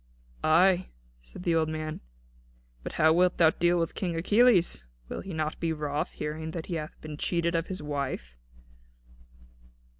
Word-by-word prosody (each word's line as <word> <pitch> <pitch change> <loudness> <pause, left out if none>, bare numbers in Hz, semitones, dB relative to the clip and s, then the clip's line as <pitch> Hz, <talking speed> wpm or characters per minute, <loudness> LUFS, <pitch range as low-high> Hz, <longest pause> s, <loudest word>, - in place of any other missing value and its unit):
'" - - -27
"Ay," 180 +3 +4 0.3
said - - -11
the 170 - +1
old 160 -1 +2
man, 155 0 -4 0.8
"but - - -6
how 160 +1 +4
wilt 180 +1 +3
thou 160 -2 +6
deal 175 +1 +2
with 165 -1 -1
King 175 -3 -2
Achilles? 195 - +3 0.3
Will - - -4
he 195 - -8
not 155 -2 -2
be 165 -1 0
wroth, 150 -1 -2
hearing 155 +1 -4
that 160 0 -5
he 180 - -5
hath 155 -2 -5
been 155 -1 -7
cheated 170 +1 0
of 165 0 0
his 185 -5 -5
wife?" 140 - -4
160 Hz, 170 wpm, -28 LUFS, 155-175 Hz, 0.8 s, thou